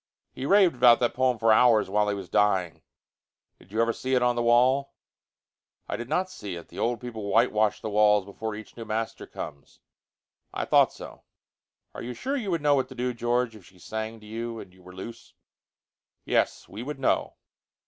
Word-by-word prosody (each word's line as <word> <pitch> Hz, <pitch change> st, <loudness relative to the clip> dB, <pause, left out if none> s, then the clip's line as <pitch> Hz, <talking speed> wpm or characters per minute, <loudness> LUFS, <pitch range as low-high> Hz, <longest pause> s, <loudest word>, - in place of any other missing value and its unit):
He 135 Hz, -, -5 dB
raved 195 Hz, -2 st, +5 dB
about 120 Hz, -1 st, +6 dB
that 120 Hz, -, +1 dB
poem 130 Hz, 0 st, +1 dB
for 115 Hz, 0 st, +4 dB
hours 115 Hz, -1 st, +5 dB
while 105 Hz, +2 st, +1 dB
he 100 Hz, -, 0 dB
was 95 Hz, -2 st, -7 dB
dying. 95 Hz, -6 st, +1 dB, 0.8 s
Did 95 Hz, -, -20 dB
you 110 Hz, +2 st, +2 dB
ever 115 Hz, 0 st, 0 dB
see 130 Hz, +2 st, -1 dB
it 125 Hz, -, +2 dB
on 120 Hz, 0 st, +2 dB
the 120 Hz, -, 0 dB
wall?" 125 Hz, +4 st, +3 dB, 0.9 s
"I -, -, -3 dB
did 120 Hz, +3 st, -6 dB
not 185 Hz, +1 st, +1 dB
see 105 Hz, -, -7 dB
it. 85 Hz, -, -10 dB
The -, -, -10 dB
old 120 Hz, 0 st, 0 dB
people 115 Hz, -4 st, -6 dB
whitewash 110 Hz, -2 st, +2 dB
the 110 Hz, -, -4 dB
walls 105 Hz, -1 st, +4 dB
before 105 Hz, +2 st, -5 dB
each 110 Hz, 0 st, -11 dB
new 115 Hz, -, -7 dB
master 110 Hz, +1 st, -4 dB
comes." 70 Hz, -2 st, -9 dB, 0.8 s
"I -, -, -2 dB
thought -, -, +4 dB
so." -, -, -11 dB, 0.7 s
"Are -, -, -7 dB
you 125 Hz, +1 st, -6 dB
sure 270 Hz, -, -3 dB
you 230 Hz, -8 st, -3 dB
would 165 Hz, -4 st, -1 dB
know 145 Hz, -1 st, +4 dB
what 135 Hz, -2 st, +1 dB
to -, -, -10 dB
do, 125 Hz, 0 st, -2 dB
George, 120 Hz, 0 st, 0 dB
if 105 Hz, -, -14 dB
she 90 Hz, +1 st, -19 dB
sang 110 Hz, +4 st, -5 dB
to -, -, -14 dB
you 115 Hz, +1 st, -5 dB
and 90 Hz, -, -11 dB
you 95 Hz, -, -20 dB
were 90 Hz, 0 st, -13 dB
loose?" 115 Hz, +5 st, -10 dB, 0.9 s
"Yes, -, -, 0 dB
we 105 Hz, -, -8 dB
would 145 Hz, +4 st, -5 dB
know." 135 Hz, -, 0 dB
115 Hz, 205 wpm, -26 LUFS, 105-125 Hz, 0.9 s, about